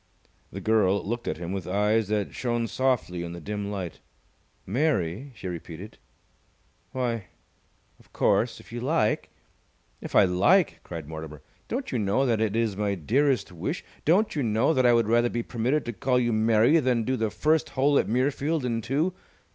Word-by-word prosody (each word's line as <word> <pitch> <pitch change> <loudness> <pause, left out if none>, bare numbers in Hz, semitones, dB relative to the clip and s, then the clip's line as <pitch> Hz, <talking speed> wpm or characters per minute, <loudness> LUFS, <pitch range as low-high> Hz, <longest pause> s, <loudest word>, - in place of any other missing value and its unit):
The 95 - -6
girl 100 -3 +2
looked 120 +2 -3
at - - -2
him 85 +1 -5
with 95 -3 -4
eyes 105 +3 +2
that 105 -1 -1
shone 120 -2 -1
softly 115 -6 0
in 85 0 -5
the 85 - -7
dim 100 +3 -4
light. 95 -5 -5 0.7
"Mary?" 125 - -1
she 100 - -7
repeated. 90 +3 -8 0.9
"Why, 120 -5 -2 0.7
of - - -24
course, 115 +1 +1
if - - -16
you 120 - -4
like 135 -4 +1 0.4
" - - -40 0.3
"If - - -7
I - - +8
like!" 100 - +3
cried 80 -4 -7
Mortimer. 80 -1 -8 0.2
"Don't 255 +3 -3
you 125 - 0
know 105 +6 +1
that 115 -4 +1
it 110 -1 0
is 115 -3 0
my 100 0 -1
dearest 125 - +1
wish? 85 - -4 0.2
Don't 190 +7 +3
you 145 - 0
know 115 +5 +2
that 130 -4 +3
I 120 - +6
would 115 -2 +3
rather 120 +1 +3
be 120 0 -2
permitted 125 +7 -1
to 120 - -4
call 125 +3 +1
you 120 -2 +1
Mary 110 +7 +4
than 125 -5 +1
do 130 +4 0
the 110 -3 0
first 155 +8 +1
hole 140 +2 +4
at - - 0
Muirfield 140 +5 0
in 115 -2 -1
two? 145 +10 0
115 Hz, 185 wpm, -26 LUFS, 100-130 Hz, 0.9 s, I